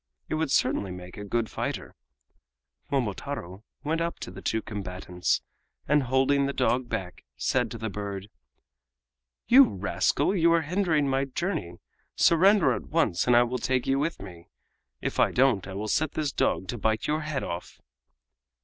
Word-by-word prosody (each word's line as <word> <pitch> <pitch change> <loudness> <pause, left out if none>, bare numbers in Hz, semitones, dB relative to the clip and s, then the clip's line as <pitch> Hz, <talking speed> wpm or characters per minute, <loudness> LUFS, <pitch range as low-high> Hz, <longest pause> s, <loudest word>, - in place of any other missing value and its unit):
It - - -2
would 155 -1 0
certainly 100 -7 +1
make 90 0 -8
a 105 - -7
good 115 +3 -1
fighter. - - -4 1.0
Momotaro 115 -5 -3 0.2
went 160 +3 -1
up 170 0 -2
to - - -6
the - - -10
two 110 - -1
combatants, 90 -3 -2 0.4
and 150 +1 +4
holding 135 +2 +2
the 140 - -2
dog 125 -1 +1
back, 95 -6 -5
said - - 0
to - - -6
the 110 0 -4
bird: 100 -1 -5 1.2
"You 265 +3 +8
rascal! 100 - 0
you 170 -2 +4
are 165 -1 +3
hindering 165 -3 +1
my 135 0 +1
journey. 135 - -3 0.4
Surrender 190 +3 +5
at - - -5
once, 115 - +1
and 125 - +5
I 120 - +7
will 125 +1 -2
take 130 -1 0
you 135 0 +1
with 160 +4 -1
me. 85 -3 -12 0.5
If - - -3
you - - +4
don't 125 -8 +2
I 95 - -7
will 105 +2 -3
set 155 +7 0
this 150 -2 -1
dog 95 - 0
to 120 - -3
bite 110 +1 0
your 155 +1 0
head 155 -3 -3
off!" 85 +1 -6
130 Hz, 170 wpm, -27 LUFS, 100-155 Hz, 1.2 s, You